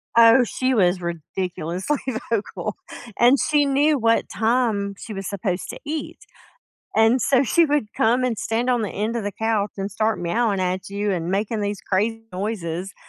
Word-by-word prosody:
Oh, 230 +2 +7
she 255 +2 -1
was 180 -3 +2
ridiculously 175 - -3 0.3
vocal, 225 -3 -2 0.4
and 245 +4 +6
she 295 -2 +2
knew 285 +2 +3
what 230 -2 +2
time 220 -3 0
she 225 - -8
was 195 -1 -5
supposed 190 -2 -3
to - - -9
eat, 300 0 -5 0.8
and 225 +3 +4
so 260 +2 +3
she 330 +6 +3
would 290 -8 0
come 240 +3 +3
and 240 -4 0
stand 235 +3 -1
on 245 -3 +2
the 205 - -2
end 215 +3 -2
of 230 - -2
the 205 - -2
couch 215 0 -1
and 195 0 -3
start 215 +2 0
meowing 200 +4 0
at 185 0 -2
you 200 +1 -2
and 175 -1 -2
making 210 +2 -1
these 205 0 -3
crazy 220 +4 0
noises, 185 -2 -4
215 Hz, 175 wpm, -22 LUFS, 195-240 Hz, 0.8 s, Oh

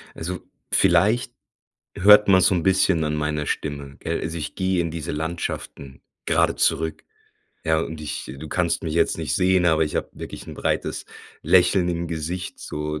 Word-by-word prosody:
Also, 90 +2 -5 0.3
vielleicht 115 +5 +3 0.6
hört 105 +2 +7
man 95 -1 +6
so 95 - +4
'n 85 - 0
bisschen 95 -3 +3
an 75 0 -1
meiner 75 0 -1
Stimme, 70 -2 -4
gell. - - -2
Also 85 0 -4
ich 75 - -5
gehe 95 -1 0
in 85 -1 -3
diese 80 -1 -4
Landschaften 75 -4 -5 0.2
grade - - +2
zurück, 80 0 0 0.6
ja, 80 -1 +2
und 80 -1 -5
ich 75 -4 -5
du 80 +2 -8
kannst 85 +2 0
mich 80 -2 -3
jetzt 85 - +2
nicht - - -1
sehen, 90 -1 +3
aber 80 -1 +3
ich 75 - -4
habe - - -2
wirklich - - -9
'n - - -8
breites - - -2 0.4
Lächeln 90 0 +4
im 85 0 -2
Gesicht 85 +3 -4
so 75 0 -4
80 Hz, 175 wpm, -23 LUFS, 75-90 Hz, 0.6 s, hört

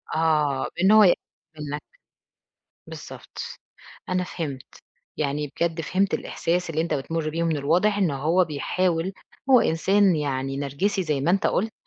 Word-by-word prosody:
آه 150 -4 +1
إن 190 - +5
هو 215 0 +8
ي 180 - +6 0.4
منك، 145 0 -4 1.1
بالضبط، - - -11 0.7
أنا 185 0 0
فهمت، 145 -8 -6 0.4
يعني 145 -1 -2
بجد 165 -1 0
فهمت 190 +4 0
الإحساس 175 0 -2
اللي 160 0 -1
أنت 165 -1 0
بتمر 155 +3 -2
بيه، 165 +2 -2
ومن 165 -2 +1
الواضح 180 +9 +2
إنه 170 -8 +1
هو 165 +7 +2
بيحاول 170 +3 -1 0.4
هو 255 -2 +8
إنسان 190 +2 +3
يعني 135 -2 -2
نرجسي 145 +9 -1
زي 150 -5 -1
ما 150 +5 +1
أنت 195 +2 +2
قُلت، 220 +4 0
165 Hz, 145 wpm, -24 LUFS, 145-185 Hz, 1.1 s, هو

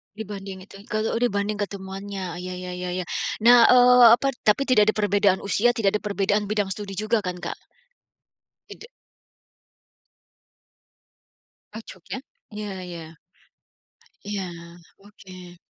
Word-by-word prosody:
Dibanding 195 -3 -8
itu - - -16
yang 200 - -14
k - - -4
eee 220 - -1
oh - - -2
dibanding 210 -3 -1
ketemuannya, 195 -2 -6
ya 180 +1 -6
ya 180 0 -7
ya 180 0 -4
ya. - - -4 0.4
Nah, 235 +1 +7
eee, 250 0 +7
apa 275 +3 +3 0.2
tapi 260 +6 +2
tidak 215 -3 +4
ada - - -26
perbedaan 200 -2 +2
usia 225 +4 +1
tidak 210 -3 0
ada - - -6
perbedaan 205 0 0
bidang 205 -1 -1
studi 195 0 -6
juga 215 +1 -1
kan, 180 -1 -4
Kak? - - -5 1.1
Tidak. 460 - -11 2.9
Cocok 220 +1 -11
ya. 260 - -3 0.3
Ya 205 -3 -6
ya. 165 -2 -9 1.1
Ya, 200 -3 -4 0.5
oke. 185 -3 -14
205 Hz, 135 wpm, -24 LUFS, 190-215 Hz, 2.9 s, Nah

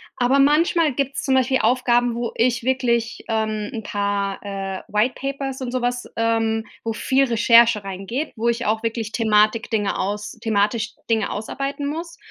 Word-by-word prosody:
Aber 255 +3 +2
manchmal 300 +1 +3
gibt's 275 +1 -2
zum 270 - +1
Beispiel 260 0 +2
Aufgaben, 245 -1 +2
wo 235 -1 -3
ich 235 0 +1
wirklich, 235 -3 0
ähm, 215 -2 -1
'n 220 - -5
paar, 200 -1 -2
äh, 195 -1 -4
White 215 +5 +1
Papers 275 -1 -4
und 250 -2 -3
sowas, 245 -1 -1
ähm 225 -1 0 0.2
wo 225 -1 -2
viel 265 +4 +2
Recherche 230 -2 +5
reingeht, 195 +9 -4
wo 230 +1 -2
ich 235 +1 -1
auch 220 +1 0
wirklich 225 -1 -2
Thematik 215 0 +2
Dinge 205 -3 0
aus 205 +2 -3
thematisch 220 +1 0 0.2
Dinge 220 -3 +1
ausarbeiten 275 +6 -4
muss 330 +3 -5
230 Hz, 160 wpm, -22 LUFS, 215-260 Hz, 0.2 s, Recherche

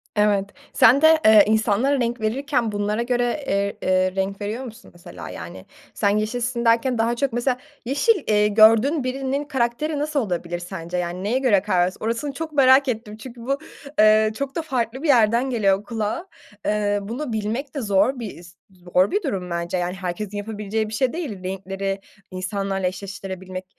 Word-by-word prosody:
Evet, 205 -2 +2 0.2
sen 255 +5 +6
de, 315 0 +6
eee, 215 -1 +8
insanlara 220 +5 +2
renk 240 -1 -1
verirken 245 +1 0
bunlara 205 +2 -1
göre, 245 0 0 0.2
eee, 200 0 -1
eee, 185 0 +1
renk 195 +1 -2
veriyor 215 +5 -3
musun 225 -3 -11
mesela 90 - -10
yani 85 +3 -9 0.3
sen 200 - +1
yeşilsin 235 +3 -1
derken 235 +2 +3
daha 230 +1 +1
çok 270 0 -1
mesela 245 +1 0 0.3
yeşil, 305 - +2
eee, 210 0 +3
gördüğün 225 +8 +5
birinin 265 +2 -2
karakteri 285 +2 -1
nasıl 300 0 0
olabilir 175 -6 -3
sence, 175 -1 -6
yani 180 +1 -3
neye 230 +6 +1
göre 230 -8 +3
kara 195 -2 0
vers 185 - -5
Orasını 230 +6 -2
çok 315 +2 -6
merak 270 0 +5
ettim 220 -3 -4
çünkü 240 +1 -11
bu, 275 +4 -1 0.4
eee, 215 0 +5
çok 280 0 -4
da 330 - 0
farklı 260 -3 -3
bir - - 0
yerden 235 -1 +4
geliyor 200 -5 +1
kulağa. 220 - -3 0.4
Eee, 205 -1 +1
bunu 235 +6 -5
bilmek 220 +8 -3
de 280 - -2
zor 215 +5 +2
bir, 220 -4 -6
e - - -13
z 175 +1 -15
zor 180 0 0
bir 410 - 0
durum 190 - -3
bence 170 +1 -2
yani 180 0 -2
herkesin 190 +2 -5
yapabileceği 215 +1 -3
bir - - -8
şey 250 +3 0
değil, 275 - -5
renkleri 195 +1 -4 0.3
insanlarla 195 0 -2
eşleştirebilmek, 190 -1 -6
215 Hz, 175 wpm, -22 LUFS, 195-255 Hz, 0.4 s, eee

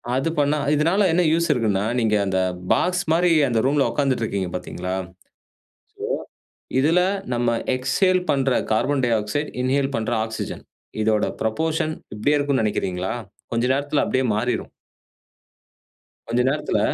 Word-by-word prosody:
அது 135 +5 0
பண்ணா. 145 +1 +2 0.2
இதுனால 165 +7 +2
என்ன 170 +2 +3
யூசு 170 +1 +2
இருக்குனா, 105 -6 0 0.2
நீங்க 110 -2 +2
அந்த 95 -1 0 0.3
பாக்ஸ் 180 0 +2
மாரி 175 +2 +3 0.2
அந்த 120 -3 +1
ரூம்ல 140 +1 +3
உட்கார்ந்துட்டு 135 -5 0
இருக்கீங்க 95 -4 -2
பார்த்தீங்களா, 90 0 -4
சோ - - -19 1.7
இதுல 160 +6 +4 0.3
நம்ம 120 0 +1 0.2
எக்ஸ்சேல் 185 +9 +2
பண்ற 135 -1 +1 0.2
கார்பன் 135 +5 +1
டைஆக்சைடு, 115 +5 0
இன்ஹேல் 135 +2 +1
பண்ற 115 +1 -2
ஆக்ஸிஜன் 110 0 -6 0.4
இதோட 110 -1 +2 0.2
புரொப்போர்ஷன் 155 +7 0 0.2
இப்டியே 145 +8 +2
இருக்கும்னு 140 -4 +1
நெனைக்கிறீங்களா. 95 -3 -1 0.4
கொஞ்சம் 120 +2 +2
நேரத்துல 145 +1 0
அப்டியே 130 0 +1
மாறிரும். 120 +4 -1 1.6
கொஞ்ச 120 +1 +1
நேரத்துல 150 -6 0
130 Hz, 130 wpm, -22 LUFS, 110-150 Hz, 1.7 s, இதுல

